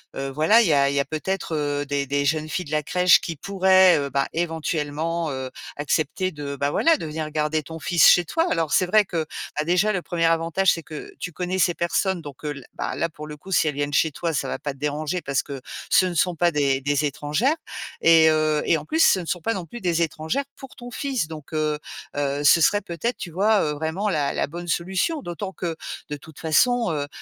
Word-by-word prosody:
heu -, -, -5 dB
heu, 135 Hz, 0 st, -3 dB
voilà 155 Hz, -, +4 dB
il -, -, +1 dB
y 155 Hz, -, +3 dB
a 140 Hz, -1 st, +4 dB
il 140 Hz, -, -2 dB
y -, -, +2 dB
a 140 Hz, -, +1 dB
peut-être, 165 Hz, +2 st, -3 dB
heu, 145 Hz, -1 st, -1 dB
des 140 Hz, -1 st, -2 dB
des 140 Hz, +1 st, 0 dB
jeunes 155 Hz, +1 st, 0 dB
filles 180 Hz, +4 st, -3 dB
de 145 Hz, -, -10 dB
la 155 Hz, 0 st, +1 dB
crèche 180 Hz, +2 st, +4 dB
qui 165 Hz, -, -5 dB
pourraient, 190 Hz, +1 st, +4 dB
heu, 140 Hz, -1 st, -3 dB
ben, 135 Hz, +1 st, 0 dB
éventuellement, 160 Hz, 0 st, -2 dB
heu, 130 Hz, -1 st, -5 dB, 0.2 s
accepter 155 Hz, +5 st, -1 dB
de, 145 Hz, -3 st, -6 dB
bah, 140 Hz, +1 st, -1 dB
voilà, 330 Hz, -, +3 dB
de -, -, -6 dB
venir 155 Hz, 0 st, -4 dB
garder 155 Hz, +1 st, 0 dB
ton 160 Hz, +2 st, -9 dB
fils 170 Hz, 0 st, +4 dB
chez 175 Hz, -, +6 dB
toi. 330 Hz, -, 0 dB
Alors 165 Hz, -3 st, 0 dB
c'est 185 Hz, -, +3 dB
vrai 215 Hz, +3 st, +4 dB
que, 165 Hz, -4 st, -3 dB, 0.3 s
bah, 150 Hz, -, 0 dB
déjà 180 Hz, +6 st, +2 dB
le 180 Hz, -, -1 dB
1er 165 Hz, -1 st, -1 dB
avantage 165 Hz, +3 st, +2 dB
c'est 165 Hz, -, -5 dB
que 155 Hz, -1 st, -9 dB
tu 180 Hz, -, -5 dB
connais 180 Hz, +2 st, -3 dB
ces 175 Hz, -1 st, +3 dB
personnes 180 Hz, +2 st, 0 dB
donc 145 Hz, -3 st, -11 dB
heu, 150 Hz, -, -2 dB
l 135 Hz, -3 st, -11 dB
ben, -, -, -4 dB
là, 170 Hz, -, -1 dB
pour 150 Hz, -1 st, -10 dB
le 150 Hz, 0 st, -8 dB
coup, 190 Hz, +6 st, -12 dB
si 165 Hz, -, +3 dB
elles 150 Hz, -, -1 dB
viennent 145 Hz, 0 st, -2 dB
chez 160 Hz, -, +3 dB
toi, 165 Hz, +3 st, -3 dB
ça -, -, -1 dB
va -, -, -3 dB
pas 145 Hz, -, -4 dB
te -, -, -19 dB
déranger 150 Hz, +4 st, -2 dB
parce 140 Hz, -3 st, -1 dB
que 140 Hz, -2 st, -7 dB, 0.3 s
ce 185 Hz, -, +5 dB
ne 175 Hz, -, -4 dB
sont 180 Hz, +1 st, +1 dB
pas 175 Hz, +2 st, +3 dB
des 140 Hz, -4 st, +1 dB
des 145 Hz, +2 st, 0 dB
étrangères 150 Hz, -, 0 dB, 0.5 s
et 165 Hz, -1 st, +6 dB
heu, 155 Hz, -1 st, +1 dB
et 165 Hz, -, +3 dB
en -, -, -11 dB
plus, 320 Hz, +1 st, +3 dB
ce 190 Hz, -, +4 dB
ne 175 Hz, -, -6 dB
sont 175 Hz, +1 st, -2 dB
pas 225 Hz, -, 0 dB
non 185 Hz, -5 st, -5 dB
plus 240 Hz, -, -9 dB
des 170 Hz, -3 st, +1 dB
étrangères 160 Hz, -, -1 dB
pour 270 Hz, -, -12 dB
ton 245 Hz, 0 st, -9 dB
fils 260 Hz, -, -2 dB
donc 155 Hz, -1 st, -10 dB
heu 155 Hz, -1 st, 0 dB, 0.4 s
heu, 145 Hz, 0 st, -1 dB
ce 145 Hz, +3 st, +6 dB
serait 205 Hz, +6 st, +3 dB
peut-être, 210 Hz, +9 st, -3 dB
tu 175 Hz, -, -5 dB
vois? 200 Hz, +5 st, +2 dB
Heu, 150 Hz, -, 0 dB
vraiment 160 Hz, +7 st, -2 dB
la 150 Hz, -6 st, 0 dB
la -, -, -1 dB
bonne 175 Hz, +4 st, -8 dB
solution. 190 Hz, -, -1 dB
D'autant 190 Hz, 0 st, -5 dB
que 170 Hz, -3 st, -4 dB, 0.3 s
de 150 Hz, -, -4 dB
toute 155 Hz, +1 st, -15 dB
façon, 240 Hz, +10 st, +3 dB
heu 145 Hz, -2 st, -2 dB
160 Hz, 250 wpm, -23 LUFS, 150-180 Hz, 0.5 s, chez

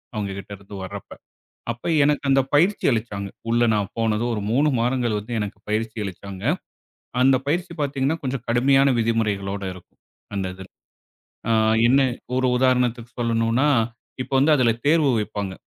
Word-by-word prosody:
அவுங்ககிட்ட 100 Hz, -2 st, -5 dB
இருந்து 100 Hz, +1 st, -11 dB
வர்றப்ப. 95 Hz, -, -9 dB, 0.6 s
அப்ப 120 Hz, +6 st, -6 dB, 0.2 s
எனக்கு 145 Hz, 0 st, +2 dB
அந்தப் 135 Hz, -1 st, +3 dB
பயிற்சி 180 Hz, +8 st, +3 dB
அளிச்சாங்க. 105 Hz, -4 st, -2 dB, 0.2 s
உள்ள 120 Hz, +1 st, +3 dB
நான் 100 Hz, -2 st, 0 dB
போனதும் 115 Hz, +1 st, 0 dB
ஒரு 105 Hz, -, -3 dB
3 140 Hz, +6 st, +3 dB
வாரங்கள் 120 Hz, -2 st, 0 dB
வந்து 110 Hz, +4 st, -8 dB
எனக்குப் 105 Hz, -1 st, -5 dB
பயிற்சி 110 Hz, +1 st, -1 dB
அளிச்சாங்க. 95 Hz, 0 st, -7 dB, 0.8 s
அந்தப் 130 Hz, 0 st, +3 dB
பயிற்சி 170 Hz, +4 st, -1 dB
பாத்தீங்கன்னா, 140 Hz, +1 st, 0 dB
கொஞ்சம் 130 Hz, -2 st, -3 dB
கடுமையான 135 Hz, +3 st, +4 dB
விதிமுறைகளோட 105 Hz, -4 st, -1 dB
இருக்கும். 90 Hz, -1 st, -16 dB, 0.4 s
அந்த 95 Hz, -2 st, -1 dB
இதுல. 95 Hz, 0 st, -11 dB, 0.8 s
ஆ, -, -, +3 dB, 0.4 s
என்னா? 135 Hz, +2 st, +4 dB, 0.3 s
ஒரு 130 Hz, -, +2 dB
உதாரணத்துக்குச் 125 Hz, -2 st, +1 dB
சொல்லணும்ன்னா, 115 Hz, +3 st, +1 dB, 0.6 s
இப்ப 130 Hz, -, -15 dB
வந்து 150 Hz, +3 st, +4 dB
அதுல 120 Hz, -3 st, +3 dB
தேர்வு 155 Hz, -3 st, +4 dB
வைப்பாங்க. 105 Hz, -2 st, -4 dB
115 Hz, 140 wpm, -23 LUFS, 105-135 Hz, 0.8 s, கடுமையான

